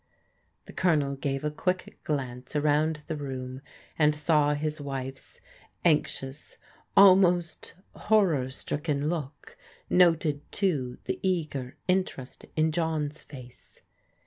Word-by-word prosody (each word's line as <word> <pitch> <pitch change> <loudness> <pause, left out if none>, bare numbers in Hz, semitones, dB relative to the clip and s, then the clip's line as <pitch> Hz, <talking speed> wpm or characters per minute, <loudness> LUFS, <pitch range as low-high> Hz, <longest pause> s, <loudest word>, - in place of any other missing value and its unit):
The - - -12
Colonel 150 -6 +2
gave 135 0 -3
a 150 - -1
quick 180 +4 -3
glance 130 -3 -4
around 150 +1 +1
the 160 - -3
room, 130 -2 -6 0.4
and 150 -1 +4
saw 150 -1 +2
his 150 +1 -3
wife's 135 -1 -6 0.5
anxious, 150 -3 0 0.4
almost 185 -3 +5 0.2
horror 180 -12 +2
stricken 145 +2 -2
look, 170 - -5 0.4
noted, 165 -5 +4
too, 140 -11 -1
the - - -3
eager 150 -9 -2
interest 180 -8 -2
in 155 0 +2
John's 155 -2 -1
face. 125 -4 -14
150 Hz, 110 wpm, -28 LUFS, 135-165 Hz, 0.5 s, almost